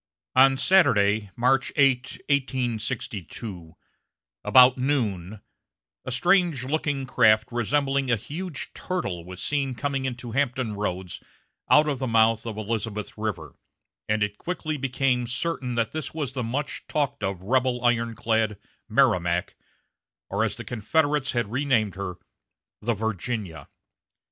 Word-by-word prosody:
On 135 +1 +6
Saturday, 110 - +3
March 130 +2 +2
8, 135 -3 +2
1862, 115 - -3 0.7
about 125 -1 +7
noon, 110 -8 -1 0.6
a 130 - -5
strange 175 0 +2
looking 145 -1 -1
craft 110 -3 +4
resembling 135 +3 0
a 120 - +4
huge 155 - -6
turtle 130 - -3
was 90 +1 -8
seen 135 -3 -1
coming 135 +1 -2
into 125 -2 -5
Hampton 125 -3 0
Roads 95 -3 -4 0.5
out 150 +1 +6
of 140 -4 -1
the 130 - -2
mouth 115 0 +3
of 110 -2 -5
Elizabeth 110 -1 -3
River, 110 -1 -4 0.6
and 105 0 +2
it 105 0 -3
quickly 165 -3 -3
became 130 -2 0
certain 125 -1 -2
that 115 -2 0
this 155 0 -5
was 145 -5 -3
the 130 - -2
much 130 +5 -3
talked 140 -2 -1
of 95 -2 -3
rebel 125 +2 +1
ironclad 115 -2 +1 0.3
Merrimac, 85 0 +2 0.8
or, - - +1
as - - -1
the - - -8
Confederates 145 +5 0
had 120 -4 -1
renamed 120 -6 +1
her, 95 -2 -5 0.7
the 115 +1 0
Virginia. 105 - -3
120 Hz, 130 wpm, -25 LUFS, 110-135 Hz, 0.8 s, about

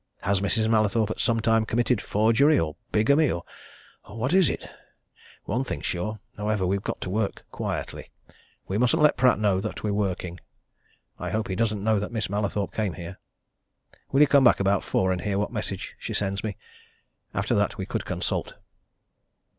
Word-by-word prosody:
Has 100 +1 +1
Mrs. 110 +2 +1
Mallathorpe 110 -1 +2
at - - -5
some 115 -1 +2
time 115 0 +3
committed 120 0 +1
forgery 115 +8 +3
or 75 -2 -2 0.2
bigamy 140 +8 +4
or 85 - -2 0.6
what 115 - -2
is 190 -4 +5
it? - - -4 0.8
One 120 +6 -1
thing's - - -5
sure, 105 +5 -2 0.2
however 105 -2 0
we've 95 +2 0
got - - -4
to - - -4
work 105 0 -2
quietly. - - -4 0.6
We 100 +3 -1
mustn't 140 +6 +3
let 150 - +5
Pratt 125 -2 +4
know 100 -3 +2
that 110 +2 -5
we're 105 -1 0
working. 90 -3 -2 0.8
I 90 - -3
hope 110 +4 -2
he 95 - -1
doesn't 105 -1 0
know 110 -1 +3
that 105 - -4
Miss 110 -4 -2
Mallathorpe 100 -1 -1
came 105 -5 -1
here. 85 +2 -8 0.9
Will 135 - +4
you 150 - +7
come 140 -1 +5
back 120 - +6
about 100 0 +2
four 95 0 +1
and 90 -2 -1
hear 100 +2 -1
what 105 - -1
message - - -4
she - - -4
sends 100 -1 -1
me? 105 -4 -4 0.8
After - - 0
that, - - +1
we - - -3
could - - -3
consult." - - -2
105 Hz, 180 wpm, -26 LUFS, 95-115 Hz, 0.9 s, you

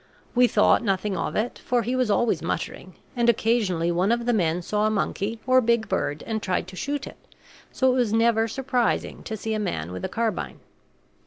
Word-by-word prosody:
We 245 0 +5
thought - - +3
nothing 195 -1 0
of 170 - -3
it, 220 +3 -2
for 245 -1 0
he 245 +3 -1
was 255 -3 +1
always 230 +2 +2
muttering; - - -4 0.2
and 240 -1 +3
occasionally 210 -7 +1
one 180 +5 +1
of 235 0 0
the 245 - +2
men 175 -4 +1
saw 210 +4 +1
a - - +2
monkey 215 +1 -2
or 255 0 +5
big 235 -1 +1
bird 155 -5 -2
and 220 -1 -2
tried 185 -3 -1
to 185 - -11
shoot 280 +7 -3
it, - - -10 0.5
so 260 -1 +2
it - - 0
was 240 -4 +1
never 225 0 +3
surprising 255 -1 -1
to 220 - -5
see 220 +2 -3
a 215 - -1
man 130 - -3
with 90 0 -6
a - - -2
carbine. 230 -1 -2
225 Hz, 210 wpm, -25 LUFS, 195-240 Hz, 0.5 s, We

